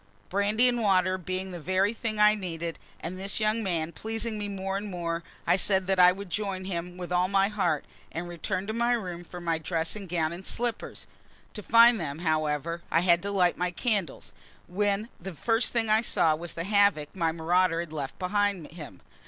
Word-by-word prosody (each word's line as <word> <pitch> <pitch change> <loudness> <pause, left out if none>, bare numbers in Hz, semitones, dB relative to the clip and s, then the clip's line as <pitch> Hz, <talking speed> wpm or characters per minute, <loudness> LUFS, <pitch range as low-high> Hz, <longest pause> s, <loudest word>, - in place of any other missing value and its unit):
Brandy 205 +5 +2
and 240 -1 +1
water 185 -3 +3
being 185 +1 -4
the 175 - -6
very 190 +5 +1
thing 225 -1 -3
I 210 0 +6
needed, 170 -5 -4 0.2
and 180 +3 -5
this 195 +2 -1
young 215 +1 +1
man 170 -5 -1
pleasing 220 +4 -3
me 205 0 -3
more 195 -1 -3
and 205 +1 -3
more, 170 -2 -3 0.2
I - - +4
said 190 0 +2
that 190 0 +1
I 180 0 +8
would 190 0 -8
join 195 -2 -2
him 180 -1 -4
with 180 -1 -6
all 180 +1 +3
my 195 +1 +3
heart, 180 -8 0 0.3
and 170 +2 -4
returned 185 +3 -3
to - - -1
my 235 +1 +2
room 180 -7 -3
for 180 +1 -9
my 165 -2 -1
dressing 165 +5 -3
gown 165 -2 0
and 175 +2 -8
slippers. 240 +3 -3 0.5
To 210 - -6
find 230 0 +6
them, 145 -2 -4
however, 155 0 -1
I 165 - +3
had 175 -1 +4
to 200 - -3
light 180 -3 +2
my 180 0 +1
candles, 195 - -2 0.3
when 205 +3 0
the 185 0 -7
first 225 - +1
thing 230 -2 0
I 215 +1 +4
saw 165 -8 +2
was 170 +1 -7
the 165 - -4
havoc 200 -6 +2
my 165 -3 +1
marauder 170 +1 +2
had 170 -2 -5
left 140 -3 -5
behind 195 -3 0
him. 150 - -10
185 Hz, 200 wpm, -28 LUFS, 170-205 Hz, 0.5 s, I